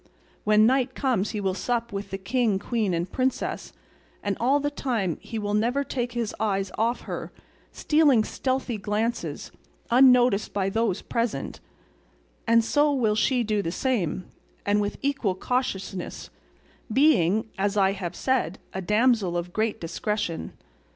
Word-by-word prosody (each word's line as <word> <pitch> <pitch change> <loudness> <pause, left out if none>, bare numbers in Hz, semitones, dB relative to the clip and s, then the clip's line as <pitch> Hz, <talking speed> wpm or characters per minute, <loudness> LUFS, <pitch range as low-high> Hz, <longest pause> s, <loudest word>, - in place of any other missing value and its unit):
When 215 0 +5
night 255 +1 +2
comes 240 -7 0
he 210 - -3
will 190 -2 0
sup 235 +2 -2
with 200 0 -4
the 195 - -4
king, 210 +2 +1
queen, 215 0 -1
and 175 +1 -2
princess; 260 0 -2 0.5
and 200 -1 0
all 265 +5 +3
the 290 +1 -1
time 225 - -2
he 225 - -6
will 205 -1 -2
never 240 +6 +1
take 245 -3 -3
his 235 -3 -2
eyes 195 -3 0
off 235 +2 0
her, - - -6 0.4
stealing 295 -7 +3
stealthy 260 -2 -2
glances, 215 +4 -2 0.4
unnoticed 250 -4 +5
by 195 -1 0
those 225 -3 0
present, 230 -1 -2 0.9
and 230 0 +4
she 290 - 0
will 275 -7 +3 0.3
do 210 -1 +1
the 165 - -3
same, 195 - -1 0.4
and 205 +1 +2
with 205 0 -2
equal 275 -9 0
cautiousness, 195 -5 -3 0.6
being, 220 - +3
as 200 +1 0
I 195 -1 +4
have 180 -3 -5
said, 245 -9 0 0.2
a 190 - -3
damsel 210 -2 +2
of 175 +1 -4
great 220 0 0
discretion. 175 0 -3
220 Hz, 145 wpm, -26 LUFS, 195-250 Hz, 0.9 s, When